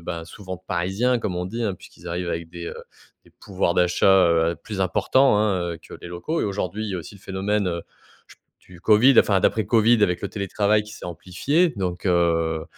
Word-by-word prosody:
bah 85 Hz, -1 st, -5 dB
souvent 95 Hz, +1 st, -8 dB
«de 90 Hz, -, -22 dB
parisiens», 95 Hz, +8 st, 0 dB
comme 95 Hz, -5 st, -3 dB
on 90 Hz, -, -2 dB
dit, 115 Hz, +4 st, -4 dB
hein, 100 Hz, -4 st, -1 dB
puisqu'ils -, -, -13 dB
arrivent 85 Hz, +1 st, -3 dB
avec 85 Hz, -1 st, -4 dB
des, 85 Hz, 0 st, -8 dB
heu, -, -, -6 dB, 0.5 s
des -, -, -21 dB
pouvoirs 95 Hz, -3 st, -2 dB
d'achat, 90 Hz, +2 st, +4 dB
heu, 85 Hz, 0 st, +2 dB
plus 105 Hz, 0 st, -6 dB
importants, 105 Hz, +6 st, +3 dB
hein, 95 Hz, -5 st, 0 dB
heu, -, -, -11 dB
que -, -, -13 dB
les 85 Hz, -, -9 dB
locaux 90 Hz, -, -3 dB
et -, -, 0 dB
aujourd'hui, 100 Hz, +1 st, -3 dB
il -, -, -4 dB
y -, -, -3 dB
a 90 Hz, -, -2 dB
aussi 85 Hz, -, -10 dB
le 100 Hz, -, -16 dB
phénomène, 100 Hz, +1 st, -1 dB
heu, 85 Hz, -1 st, -3 dB, 0.4 s
je -, -, -18 dB
p -, -, -48 dB, 0.3 s
du 85 Hz, -, -13 dB
Covid, 110 Hz, +7 st, +5 dB
enfin 100 Hz, -2 st, +2 dB
d'après 110 Hz, +4 st, +1 dB
Covid 115 Hz, -1 st, +4 dB
avec 90 Hz, -3 st, +2 dB
le 100 Hz, -, -2 dB
télétravail 105 Hz, +1 st, 0 dB
qui 105 Hz, -, -12 dB
s'est -, -, -10 dB
amplifié 115 Hz, -, 0 dB
donc, 90 Hz, -3 st, -3 dB
heu, 85 Hz, -3 st, +1 dB
95 Hz, 225 wpm, -23 LUFS, 85-105 Hz, 0.5 s, Covid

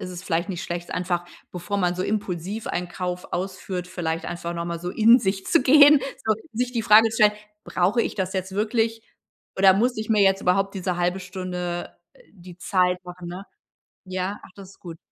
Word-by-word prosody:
ist 185 Hz, -, -6 dB
es 180 Hz, 0 st, -8 dB
vielleicht 170 Hz, +2 st, -1 dB
nicht 175 Hz, -3 st, -4 dB
schlecht, 175 Hz, 0 st, -5 dB
einfach, 175 Hz, -1 st, -2 dB, 0.3 s
bevor 180 Hz, +3 st, -4 dB
man 180 Hz, -2 st, +1 dB
so 185 Hz, -, -2 dB
impulsiv 200 Hz, 0 st, -3 dB
einen 175 Hz, 0 st, -3 dB
Kauf 180 Hz, 0 st, -5 dB
ausführt, 180 Hz, 0 st, -4 dB
vielleicht 165 Hz, -2 st, -3 dB
einfach 170 Hz, 0 st, -5 dB
noch 170 Hz, 0 st, -4 dB
mal 170 Hz, -1 st, -4 dB
so 175 Hz, -, -4 dB
in 230 Hz, +5 st, +5 dB
sich 195 Hz, 0 st, -2 dB
zu 335 Hz, -5 st, +3 dB
gehen, 290 Hz, +1 st, +7 dB, 0.5 s
sich 245 Hz, +2 st, -2 dB
die 235 Hz, -2 st, -1 dB
Frage 220 Hz, +1 st, +7 dB
zu 225 Hz, -, -5 dB
stellen: 210 Hz, 0 st, +6 dB, 0.3 s
„Brauche 200 Hz, +7 st, +1 dB
ich -, -, -4 dB
das 190 Hz, -1 st, -2 dB
jetzt 190 Hz, -1 st, -3 dB
wirklich 225 Hz, +2 st, 0 dB, 0.5 s
oder 190 Hz, 0 st, +6 dB
muss 240 Hz, +6 st, +1 dB
ich 215 Hz, 0 st, -4 dB
mir 215 Hz, -2 st, +3 dB
jetzt 195 Hz, 0 st, +3 dB
überhaupt 195 Hz, +2 st, +1 dB
diese 180 Hz, -1 st, -2 dB
1/2 180 Hz, +2 st, 0 dB
Stunde 180 Hz, -1 st, -5 dB, 0.4 s
die 180 Hz, -2 st, -14 dB
Zeit 180 Hz, -1 st, +1 dB
machen”, 180 Hz, -1 st, -9 dB
ne? 180 Hz, +3 st, -7 dB, 0.6 s
Ja? 185 Hz, +2 st, -3 dB
Ach, -, -, -14 dB
das 195 Hz, -2 st, -12 dB
ist -, -, -19 dB
gut. 170 Hz, -2 st, -9 dB
185 Hz, 200 wpm, -24 LUFS, 175-210 Hz, 0.6 s, gehen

